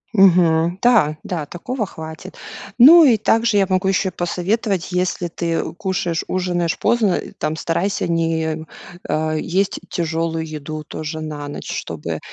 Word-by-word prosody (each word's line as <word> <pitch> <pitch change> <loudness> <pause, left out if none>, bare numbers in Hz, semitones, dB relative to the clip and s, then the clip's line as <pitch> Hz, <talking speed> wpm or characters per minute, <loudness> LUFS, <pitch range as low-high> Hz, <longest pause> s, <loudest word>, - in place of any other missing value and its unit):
Мгм, 175 -3 +4
да, 210 -12 +4
да, 165 -5 -4
такого 215 - -4
хватит. 160 -3 -9 0.4
Ну, 325 +8 +9
и 250 -7 +5
также 225 +1 +2
я 195 - +4
могу 185 0 0
ещё 190 0 +1
посоветовать, 185 +2 -2
если 180 -1 -1
ты 170 0 -3
кушаешь 175 -2 -2
ужинаешь 175 -2 -1
поздно, 220 -6 +2
э, - - -4
там 155 +1 -2
старайся 170 +5 -1
не, 160 -1 -1 0.4
а, 155 0 0
есть 185 +5 -1
тяжелую 165 -1 -2
еду 155 0 -6
тоже 155 +1 -6
на 150 -2 -6
ночь, 145 - -7
чтобы 80 0 -5
170 Hz, 140 wpm, -20 LUFS, 160-195 Hz, 0.4 s, Ну